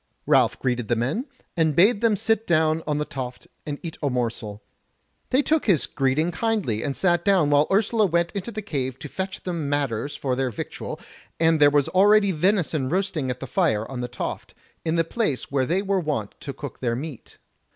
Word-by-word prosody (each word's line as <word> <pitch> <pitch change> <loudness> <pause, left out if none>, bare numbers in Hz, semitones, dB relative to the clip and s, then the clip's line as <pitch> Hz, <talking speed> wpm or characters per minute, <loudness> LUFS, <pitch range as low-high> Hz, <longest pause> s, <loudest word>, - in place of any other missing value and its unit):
Ralph - - +3
greeted 125 -3 -1
the 120 - +2
men, 140 - -1 0.3
and 160 -3 +2
bade 205 +5 +5
them 230 -2 +3
sit 225 +2 0
down 160 -1 +3
on 150 -1 0
the 150 - -1
toft 125 -3 -6 0.2
and 145 -1 -3
eat 165 -2 -7
a 145 - +1
morsel; 115 -4 -3 0.7
they 265 +3 +3
took 315 -2 +1
his 180 -9 +4
greeting 140 +5 0
kindly, 185 - -1
and 140 -2 -3
sat 175 -2 +2
down, 185 -7 +3
while 145 +1 +4
Ursula 215 +1 +3
went 170 0 +1
into 200 +2 -4
the 215 -1 -5
cave 130 -8 -3
to 150 - -8
fetch 190 +5 -5
them 170 -5 -3
matters 140 -2 -1
for 130 -2 -1
their 130 0 0
victual, 110 - -6 0.4
and 160 -1 +4
there 145 -1 +7
was 145 -1 +2
already 200 +1 +5
venison 165 -5 +1
roasting 180 -6 -1
at 125 0 -3
the - - -3
fire 110 -4 +1
on 125 -2 -4
the 125 - -2
toft, 125 - -6 0.3
in 160 0 0
the 165 - +3
place 165 - -2
where 135 -2 +1
they 185 +4 +1
were 195 -1 +1
wont 145 - -2
to 140 - -6
cook 140 -2 -8
their 120 -2 0
meat. 140 -1 -8
155 Hz, 205 wpm, -24 LUFS, 130-190 Hz, 0.7 s, there